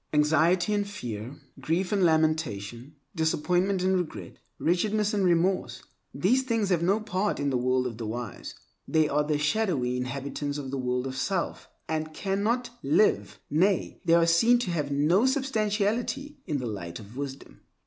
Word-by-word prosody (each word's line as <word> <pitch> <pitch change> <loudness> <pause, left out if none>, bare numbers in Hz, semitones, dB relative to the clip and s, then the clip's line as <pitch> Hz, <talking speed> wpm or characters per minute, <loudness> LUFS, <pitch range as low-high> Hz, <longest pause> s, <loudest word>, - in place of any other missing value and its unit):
Anxiety 160 +6 +3
and 205 -1 0
fear, 120 - -6 0.2
grief 165 +7 -1
and 200 -2 +2
lamentation, 155 - 0 0.2
disappointment 180 +4 +1
and 190 0 +2
regret, 180 -4 -4 0.2
wretchedness 210 +5 +1
and 205 -2 +1
remorse—these 185 - 0
things 230 -6 0
have 175 -3 +2
no 195 +5 +2
part 210 -1 -1
in 140 -1 0
the 130 - +1
world 130 +1 +1
of 120 -2 -5
the 115 - -4
wise. 115 -1 -6 0.3
They 155 -1 +3
are 150 +1 +1
the 150 0 0
shadowy 150 - 0
inhabitants 140 +3 -3
of 135 -3 -5
the 135 - -3
world 125 0 -1
of 130 0 -4
self, 175 +7 -2 0.2
and 155 0 -3
cannot 220 +5 -1
five, 420 +7 +2
nay, 185 +6 +1
they 170 -1 +4
are 170 -1 +5
seen 195 +9 +5
to 185 - -2
have 150 -4 -1
no 165 - +3
substantiality—in 245 - -1
the 125 - -4
light 85 -6 -5
of 110 +2 -12
wisdom. 140 0 -7
165 Hz, 160 wpm, -27 LUFS, 140-200 Hz, 0.3 s, are